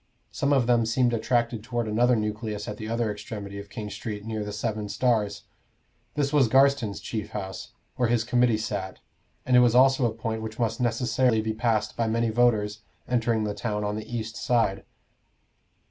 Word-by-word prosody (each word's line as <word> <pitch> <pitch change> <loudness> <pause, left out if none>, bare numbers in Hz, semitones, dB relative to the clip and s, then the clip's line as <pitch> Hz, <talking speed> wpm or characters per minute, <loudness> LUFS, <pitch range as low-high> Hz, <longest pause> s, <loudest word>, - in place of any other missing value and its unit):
Some 140 - 0
of 135 -4 +4
them 120 -1 +3
seemed 120 +1 +2
attracted 115 -1 0
toward 120 -1 -2
another 120 +3 +3
nucleus 105 -1 -3
at 105 - -5
the 110 0 -6
other 115 -1 0
extremity 105 -1 -7
of 100 0 -10
King 105 -1 -6
Street, 105 -2 -6
near 110 -1 -3
the 105 - -5
Seven 105 -1 -3
Stars. 110 -3 0 0.7
This 145 0 0
was 140 -5 +5
Garstin's 135 -5 +3
chief 110 -3 -5
house, 95 -3 -6 0.2
where 125 -2 +2
his 120 -1 +2
committee 120 -1 +2
sat, 105 -4 -4 0.5
and 130 - +3
it - - +8
was 120 -1 +4
also 130 0 +5
a - - -2
point 110 0 -4
which 110 +1 -6
must 115 0 -1
necessarily 120 0 +2
be 110 0 -1
passed 110 -1 0
by 115 - 0
many 115 0 +1
voters 110 -3 +2 0.3
entering 115 -2 +1
the 105 -1 -2
town 105 0 -3
on 105 0 -1
the 110 +2 -7
eastern 115 -1 -4
side. 100 -5 +1
115 Hz, 185 wpm, -26 LUFS, 105-120 Hz, 0.7 s, it